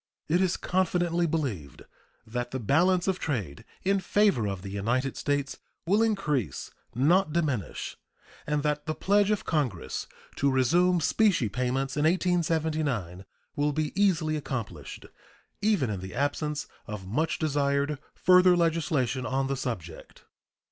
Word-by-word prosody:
It 175 +4 +2
is 185 -2 +1
confidently 175 -2 +1
believed 120 - -3 0.4
that 120 +2 -3
the 130 - -4
balance 175 - +2
of 190 -1 0
trade 105 - -3 0.2
in 195 +1 +2
favor 195 - +2
of 95 -2 -4
the 100 - -6
United 120 +7 -1
States 145 -1 -2 0.3
will 200 +6 +3
increase, 195 - -1 0.2
not 155 +7 +3
diminish, 145 - -2 0.5
and 150 -1 0
that 150 0 -1
the 155 - -1
pledge 205 +1 +2
of 210 -2 0
Congress 125 - -2 0.3
to 140 - +2
resume 170 +7 +3
specie 180 - +2
payments 130 +4 -1
in 150 +1 +1
1879 155 - 0 0.3
will 145 0 +1
be 155 0 -1
easily 170 -6 +2
accomplished, 115 - -5 0.6
even 200 - +2
in 100 - -3
the 95 +2 -8
absence 150 +2 -1 0.2
of 105 -3 -6
much 155 - 0
desired 145 -1 0 0.2
further 180 -1 +5
legislation 155 -7 +1
on 135 +1 0
the 135 0 -1
subject. 110 -11 -6
150 Hz, 135 wpm, -28 LUFS, 125-175 Hz, 0.6 s, further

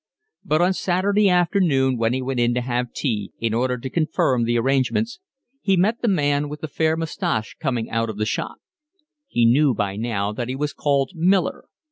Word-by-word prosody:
But 155 +3 +2
on 185 +2 +3
Saturday 195 +3 +2
afternoon 170 -7 +2
when 115 -1 +1
he 130 +1 -1
went 130 -1 -2
in 120 0 +2
to 125 - 0
have 125 0 -2
tea, 105 -8 -3
in 115 -1 -1
order 125 +2 0
to 125 - -6
confirm 155 -4 +1
the 120 +1 +1
arrangements, 135 - 0 0.4
he 195 -2 +2
met 215 +6 +1
the 240 - 0
man 145 -6 +1
with 150 +1 -8
the 155 - -3
fair 160 +2 0
moustache 165 - -2
coming 125 -6 -1
out 115 0 0
of 110 - -6
the 105 - 0
shop. 110 - -3 0.7
He 120 - +2
knew 130 +2 +4
by 100 -1 -2
now 105 -3 -1
that 120 +2 -4
he 130 - -2
was 145 +2 -2
called 140 -2 0
Miller. 185 +3 +1
135 Hz, 195 wpm, -22 LUFS, 120-170 Hz, 0.7 s, knew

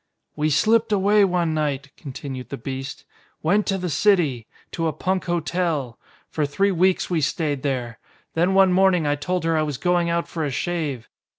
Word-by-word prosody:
"We 150 +1 0
slipped 215 +9 +3
away 205 +1 +4
one 175 -4 +1
night," 140 -3 -2
continued 130 -4 -7
the - - -5
beast. 135 +3 -6 0.4
"Went 200 +6 +2
to 195 - +1
the 180 -1 -3
city. 150 - +2 0.2
To 165 -1 -1
a 155 - -1
punk 185 0 -1
hotel. 170 -7 -1 0.3
For 155 - -2
three 195 +8 +1
weeks 185 +1 +1
we 165 -3 +1
stayed 145 -1 -1
there. 125 -4 -3 0.3
Then 175 +4 +2
one 190 -1 +5
morning 185 -3 +3
I 145 - +2
told 180 +5 -2
her 165 0 +1
I 155 - +2
was 150 -4 -2
going 175 +1 +1
out 170 0 0
for 165 - -4
a 145 - -1
shave. 145 -3 -3
165 Hz, 185 wpm, -23 LUFS, 140-185 Hz, 0.4 s, one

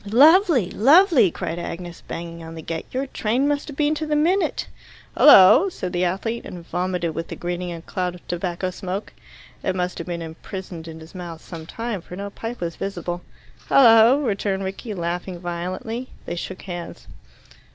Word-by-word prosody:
"Lovely! 280 - +5
Lovely!" 300 - +6
cried 165 +1 -4
Agnes, 175 0 -6
banging 170 0 -6
on 165 0 -9
the 160 - -8
gate, 165 0 -5
"Your 260 +2 -1
train 255 +1 0
must 290 -1 -1
have 290 -3 -8
been 300 0 +2
to 310 0 -3
the 300 - +1
minute." 350 +6 +1 0.5
"Hullo!" 265 - +8
said 185 - -5
the 180 +1 +1
athlete, 225 +6 -2
and 175 -2 -9
vomited 180 -2 -2
with 165 +1 -4
the - - -6
greeting 175 0 -4
a 165 -1 -7
cloud 180 -1 -3
of 175 - -16
tobacco 175 +1 -2
smoke. 190 +2 -5 0.5
It 190 - -1
must 180 0 -2
have 170 - -6
been 170 -1 -4
imprisoned 165 +1 -8
in 160 0 -9
his 160 - -13
mouth 175 -3 -7
some 160 -1 -9
time, 225 -1 -4
for 180 - -10
no 200 +1 -6
pipe 230 +2 -6
was 170 -1 -3
visible. 175 -2 -4 0.5
"Hullo!" 235 +1 +7
returned 195 -3 -1
Rickie, 195 +3 -5
laughing 175 +1 -3
violently. 185 +8 -4 0.2
They - - -4
shook 185 +2 -6
hands. 175 -2 -7
185 Hz, 180 wpm, -23 LUFS, 175-235 Hz, 0.5 s, Hullo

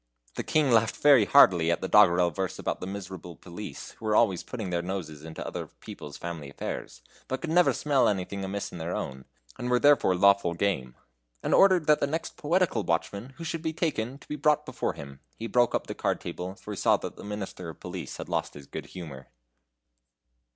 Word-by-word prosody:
The - - -3
King 150 -4 +2
laughed 115 -1 +3
very 140 -7 +6
heartily 90 -12 +6
at 85 - +1
the - - -2
doggerel 85 0 +5
verse 95 +2 -3
about - - -3
the 90 - -5
miserable 95 -3 -7
police, 95 +6 -8
who 115 - -12
were 105 -1 +2
always 100 -7 +3
putting 110 -7 -6
their 85 -1 0
noses 85 -5 -5
into 80 0 -7
other - - -5
people's 75 - -10
family 85 -5 -6
affairs, - - -6 0.2
but 130 - -2
could 165 - -4
never 175 +1 +5
smell 135 -5 +2
anything 100 0 -2
amiss 95 +1 -4
in 90 - -8
their 85 +2 -3
own, 65 -1 -5 0.3
and 125 - -3
were 125 - +4
therefore 140 -10 +5
lawful 100 -2 +4
game, 75 -10 -1 0.5
and - - 0
ordered 185 -4 +6
the 150 -1 +4
next 160 +3 -3
poetical 165 -6 +1
watchman 100 +8 -2
who 170 - -7
should 165 0 -3
be 160 -1 -2
taken 135 -7 -2
to - - -19
be 150 - -4
brought 150 0 +2
before - - -2
him. 70 -1 -10 0.2
He 115 - -5
broke 120 +2 +2
up - - -1
the - - -5
card - - -1
table, 90 +2 -6
for 105 - -9
he 100 - -5
saw - - +4
that - - -7
the - - -11
Minister 100 -4 -6
of 80 - -10
Police - - -6
had - - -6
lost - - -2
his 70 -1 -10
good - - -7
humor. 70 -7 -9
100 Hz, 210 wpm, -28 LUFS, 85-135 Hz, 0.5 s, very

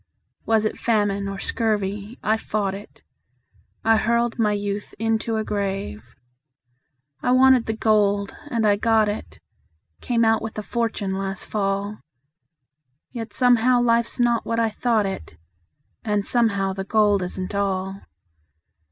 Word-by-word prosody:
Was 220 -1 +3
it 215 - -2
famine 205 -3 +1
or 195 0 -4
scurvy 210 +1 -2
I 215 - +2
fought 205 -3 -2
it; 200 +2 -11 0.8
I 225 0 +4
hurled 235 +2 0
my 215 -2 +3
youth 205 0 -4
into 225 +1 0
a 220 - 0
grave. 195 - -4 1.1
I - - 0
wanted 260 -2 +5
the 220 - -1
gold, 205 -2 +2
and 230 -5 0
I 205 -1 +4
got 220 0 +3
it 205 +1 -5 0.6
Came 230 -2 +1
out 225 0 +3
with 225 -1 -6
a 215 - -3
fortune 225 -4 -2
last 195 0 -3
fall, 200 0 -2 1.1
Yet 230 -3 -6
somehow 245 0 +4
life's 235 0 +2
not 240 -1 +2
what 230 0 -1
I 225 -1 +1
thought 225 -2 +1
it, 85 - -6 0.7
And 210 -2 0
somehow 200 -5 +1
the 195 0 -4
gold 205 -1 +3
isn't 185 +2 -4
all. 195 -1 -2
215 Hz, 140 wpm, -23 LUFS, 200-230 Hz, 1.1 s, wanted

